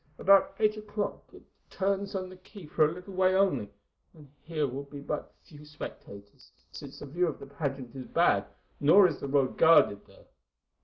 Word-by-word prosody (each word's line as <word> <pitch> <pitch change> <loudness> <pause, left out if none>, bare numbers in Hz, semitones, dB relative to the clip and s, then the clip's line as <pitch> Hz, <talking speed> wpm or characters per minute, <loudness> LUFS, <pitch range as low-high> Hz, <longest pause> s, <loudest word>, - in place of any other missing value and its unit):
About 195 0 +4
eight 215 0 +1
o'clock 210 -1 -5
it - - -15 0.3
turns 195 +1 -2
on 190 - -2
to 185 - -9
the 185 - -12
quay 185 0 -13
for 155 +1 +2
a 150 - 0
little 180 +3 -10
way 185 0 +2
only, 165 - +1 0.5
and 150 -2 -15
here 155 -2 -2
will 135 +2 -5
be 140 0 -10
but 145 +1 -5
few 150 -4 -15
spectators, 100 -9 -11 0.2
since - - -10
the - - -9
view 175 +6 0
of 155 - -4
the - - -10
pageant 140 -3 -5
is 130 -1 -8
bad, - - +2 0.3
nor 180 +8 +6
is 160 - -5
the - - -5
road 135 -1 0
guarded 160 -11 +5
there. - - -20
160 Hz, 195 wpm, -29 LUFS, 140-190 Hz, 0.5 s, nor